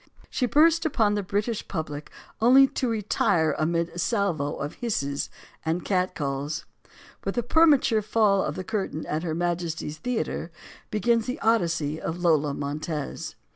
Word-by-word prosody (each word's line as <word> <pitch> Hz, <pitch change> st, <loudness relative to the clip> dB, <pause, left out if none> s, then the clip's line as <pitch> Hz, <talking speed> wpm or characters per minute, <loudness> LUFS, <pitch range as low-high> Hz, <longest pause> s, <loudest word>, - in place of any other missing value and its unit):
Then -, -, -27 dB
she 255 Hz, -, +1 dB
burst 325 Hz, +5 st, +4 dB
upon 225 Hz, -10 st, +2 dB
the 205 Hz, -, 0 dB
British 205 Hz, +3 st, -2 dB
public 150 Hz, -4 st, -5 dB, 0.3 s
only 260 Hz, +4 st, +8 dB
to 255 Hz, -, -1 dB
retire 195 Hz, -7 st, +1 dB
amid 170 Hz, +2 st, +1 dB
a 170 Hz, -, -8 dB
salvo 175 Hz, -, 0 dB
of 145 Hz, +1 st, -4 dB
hisses 140 Hz, -, -1 dB, 0.3 s
and 165 Hz, +2 st, -1 dB
catcalls. 155 Hz, -7 st, -1 dB, 0.6 s
With 195 Hz, -, -2 dB
the 240 Hz, -, 0 dB
permature 275 Hz, -5 st, +4 dB
fall 205 Hz, -2 st, +3 dB
of -, -, -3 dB
the 185 Hz, -, -4 dB
curtain 190 Hz, -6 st, -3 dB
at 155 Hz, -, -2 dB
Her 160 Hz, -2 st, -2 dB
Ma 175 Hz, +1 st, +1 dB
jesty's 165 Hz, -3 st, -5 dB
Theater, 245 Hz, -8 st, -2 dB, 0.4 s
begins 230 Hz, +1 st, +1 dB
the 255 Hz, +4 st, -3 dB
Odyssey 165 Hz, -9 st, +1 dB
of 165 Hz, -, -3 dB
Lola 155 Hz, -5 st, +2 dB
Montez. 150 Hz, +1 st, -4 dB
180 Hz, 155 wpm, -26 LUFS, 155-225 Hz, 0.6 s, only